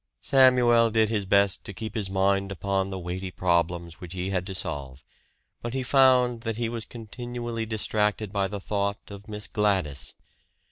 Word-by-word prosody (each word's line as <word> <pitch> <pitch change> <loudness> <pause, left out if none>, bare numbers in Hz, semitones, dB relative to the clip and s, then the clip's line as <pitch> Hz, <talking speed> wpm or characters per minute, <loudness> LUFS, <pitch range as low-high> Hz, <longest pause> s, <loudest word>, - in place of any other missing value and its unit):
Samuel 125 -3 +5
did 110 -1 +2
his 105 -4 -1
best 100 0 +3
to 100 - -6
keep 110 +2 -6
his 105 -5 -2
mind 100 +1 +1
upon 95 0 -1
the 95 - -4
weighty 90 +1 -4
problems 85 -2 -1
which 90 -1 -8
he 95 +1 -3
had 90 -1 -1
to 95 - -5
solve; 70 -6 -5 0.6
but 120 +2 -4
he 130 - -1
found 125 -2 +4
that 115 -1 -3
he 115 -1 -1
was 115 -2 -5
continually 120 0 -5
distracted 105 -1 -1
by 100 -1 +1
the 100 +1 -5
thought 100 +1 -3
of 100 +1 -10
Miss 105 -1 -6
Gladys. 95 -10 0
100 Hz, 175 wpm, -26 LUFS, 95-115 Hz, 0.6 s, Samuel